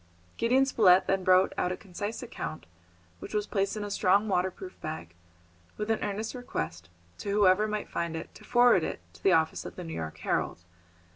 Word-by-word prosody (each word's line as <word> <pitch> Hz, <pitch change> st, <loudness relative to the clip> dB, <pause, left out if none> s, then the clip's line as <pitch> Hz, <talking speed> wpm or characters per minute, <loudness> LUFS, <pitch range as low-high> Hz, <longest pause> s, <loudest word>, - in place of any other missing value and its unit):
Gideon 255 Hz, +4 st, +3 dB
Spilett 190 Hz, -8 st, +5 dB
then 195 Hz, -1 st, 0 dB
wrote 185 Hz, +1 st, +5 dB
out 180 Hz, -, +1 dB
a 185 Hz, -, -3 dB
concise 205 Hz, +5 st, -5 dB
account, 190 Hz, -9 st, -6 dB, 0.5 s
which -, -, -7 dB
was 210 Hz, -1 st, +1 dB
placed 200 Hz, 0 st, -1 dB
in 210 Hz, -, -3 dB
a 205 Hz, -, -5 dB
strong 200 Hz, +2 st, +3 dB
waterproof 185 Hz, -1 st, -2 dB
bag, 155 Hz, -, -6 dB, 0.6 s
with 210 Hz, +1 st, -1 dB
an 220 Hz, -, +1 dB
earnest 210 Hz, +2 st, -3 dB
request 85 Hz, -, -5 dB, 0.3 s
to -, -, -5 dB
whoever 200 Hz, 0 st, +4 dB
might 210 Hz, -1 st, -3 dB
find 170 Hz, -1 st, -3 dB
it 160 Hz, -, -7 dB
to -, -, -15 dB
forward 240 Hz, -7 st, +5 dB
it -, -, -3 dB
to 85 Hz, -, -17 dB
the -, -, +4 dB
office 160 Hz, -1 st, +2 dB
of -, -, -8 dB
the 180 Hz, -, -6 dB
New 165 Hz, -1 st, -6 dB
York 80 Hz, -1 st, -5 dB
Herald. 85 Hz, -, -2 dB
195 Hz, 195 wpm, -29 LUFS, 170-215 Hz, 0.6 s, Spilett